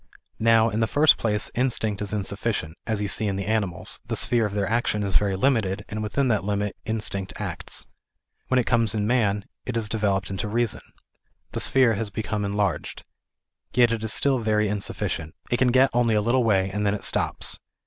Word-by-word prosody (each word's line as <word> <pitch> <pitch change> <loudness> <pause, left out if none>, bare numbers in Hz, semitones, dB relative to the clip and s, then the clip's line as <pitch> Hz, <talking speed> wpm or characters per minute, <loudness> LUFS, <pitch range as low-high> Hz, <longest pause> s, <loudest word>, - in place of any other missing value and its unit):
Now 115 0 +4
in 110 - -1
the 110 - +2
first 145 +7 +5
place 105 -2 0
instinct 110 -5 0
is 105 - -2
insufficient; 100 -4 -2
as 110 -2 -1
you - - -1
see 110 +2 0
in 100 - -1
the 95 0 -3
animals, 100 -5 -1
the - - -2
sphere 115 -3 +2
of 100 - -8
their 100 -1 0
action 110 -2 0
is 100 -2 -2
very 100 -2 +2
limited, 100 -3 +1
and 110 +1 -4
within 130 +6 0
that 110 -5 +1
limit 105 0 -1
instinct 105 -4 -3
acts. - - -4 0.6
When 130 - +2
it 125 - +2
comes 115 -3 +2
in 105 -1 0
man, 105 -4 +1 0.2
it 125 - -4
isaleveloped 105 -4 -1
into 95 +2 -3
reason. 115 +1 0 0.7
The - - -3
sphere 130 -4 +4
has 110 0 -2
become 105 0 -3
enlarged. 100 -2 -2 0.7
Yet 120 -1 +5
it 115 -1 -2
is 110 - 0
still 135 +1 +2
very 105 -1 +1
insuffi 100 -1 -3
cient. 80 -1 -4 0.2
It 120 - +3
can 125 +1 +3
get 130 +2 +4
only 120 -2 +2
a 105 - +3
little 120 +4 +2
way 95 -4 +2
and 105 +1 -2
then 100 0 +1
it 105 - -7
stops. - - 0
105 Hz, 200 wpm, -25 LUFS, 100-115 Hz, 0.7 s, first